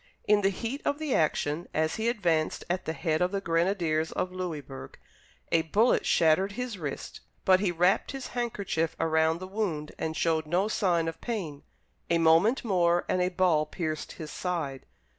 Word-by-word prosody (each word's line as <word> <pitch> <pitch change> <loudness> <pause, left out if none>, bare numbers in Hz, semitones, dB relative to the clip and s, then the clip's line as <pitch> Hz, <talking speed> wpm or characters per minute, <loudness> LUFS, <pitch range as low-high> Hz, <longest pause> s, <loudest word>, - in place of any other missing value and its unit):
In 210 0 +5
the 195 - +3
heat 230 +8 -4
of 285 - 0
the 305 -4 -2
action, 155 +1 0
as 155 0 +1
he 225 +1 +1
advanced 170 -9 0
at 180 - -2
the 160 - -2
head 160 -1 -1
of 180 +1 +2
the 200 - -1
grenadiers 165 -3 0
of 180 - -2
Louisburg, 160 -7 -6 0.5
a 165 - +4
bullet 205 +10 +2
shattered 170 +5 +3
his 240 -3 -4
wrist, 145 -4 -5 0.3
but 185 -1 +6
he 190 -2 +1
wrapped 180 +3 +2
his 270 -2 -6
handkerchief 200 -9 -2
about 160 0 +2
the 185 +1 -7
wound, 185 -7 -3
and 160 0 -3
showed 160 -2 +1
no 180 +6 +1
sign 175 -6 +1
of 165 - -5
pain. 175 -12 -4 0.5
A 170 - +3
moment 165 +11 +4
more 175 -4 +2
and 185 - +1
a 180 - +2
ball 175 -5 +2
pierced 155 -2 -4
his 155 -2 -8
side. 160 -8 -3
175 Hz, 180 wpm, -28 LUFS, 160-200 Hz, 0.5 s, but